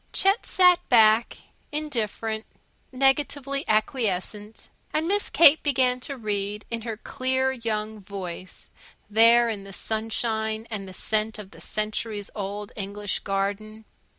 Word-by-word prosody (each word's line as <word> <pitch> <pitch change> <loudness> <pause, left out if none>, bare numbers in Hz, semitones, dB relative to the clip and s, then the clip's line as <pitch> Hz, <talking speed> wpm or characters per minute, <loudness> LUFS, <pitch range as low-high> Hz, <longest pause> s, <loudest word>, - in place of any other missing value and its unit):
Chet 390 +4 +2
sat 360 -2 +5
back, 225 -2 +5 0.3
indifferent, 225 -7 -3 0.5
negatively 275 +1 +1
acquiescent. 215 -1 -1 0.2
And 315 +2 0
Miss 405 +2 +1
Kate 315 -2 +7
began 255 -3 +2
to 275 +2 -5
read 210 -2 -3
in 230 -1 -2
her 225 -1 -5
clear 260 +2 0
young 220 -3 -3
voice, 185 -2 -7 0.4
there 230 +2 +6
in 210 -4 -3
the 195 - -11
sunshine 220 +1 -2
and 195 -3 -6
scent 215 +2 -1
of 200 -2 -10
the - - -13
centuries 215 -1 -3
old 205 +2 -5
English 205 -1 -3
garden. 205 +3 -3
220 Hz, 125 wpm, -25 LUFS, 210-255 Hz, 0.5 s, Kate